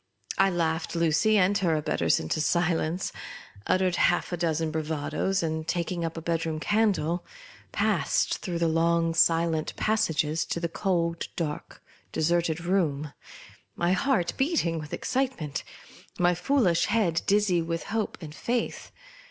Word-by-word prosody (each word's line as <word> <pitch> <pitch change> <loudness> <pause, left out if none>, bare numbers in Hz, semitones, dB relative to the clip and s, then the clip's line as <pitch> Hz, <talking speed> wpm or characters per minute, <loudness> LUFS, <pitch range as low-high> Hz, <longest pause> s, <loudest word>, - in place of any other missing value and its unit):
I 195 0 +5
laughed 165 -2 -1
Lucy 170 +6 +3
and 195 +1 +3
her 170 -4 +2
abettors 150 - +1
into 80 - -2
silence; 170 +1 0 0.6
uttered 185 -1 +2
half 175 - +2
a - - 0
dozen 160 -1 0
bravadoes; 160 +4 -1
and 160 0 -2
taking 175 0 -2
up 165 0 -3
a 165 - -6
bed 165 -1 0
room 160 -1 -2
candle, 180 -4 +1 0.5
passed - - +1
through 180 -4 -3
the 170 0 +1
long 165 +1 +2
silent 165 -1 +2
passages, 165 -8 +1
to - - -3
the 170 - -1
cold, 170 -2 -1
dark, 150 -3 -5 0.3
deserted 170 0 +1
room 155 -6 0 0.3
— - - -16 0.3
my 175 +1 +1
heart 190 -3 +1
beat 305 - +1
ing 165 -1 -1
with 150 -1 -8
excitement, 250 - -2 0.5
my 175 0 +3
foolish 180 -3 +2
head 205 -7 +1
dizzy 200 -4 +3
with 165 0 -3
hope 220 -2 -1
and 155 -2 -8
faith. 235 +7 -3
170 Hz, 145 wpm, -27 LUFS, 160-185 Hz, 0.6 s, I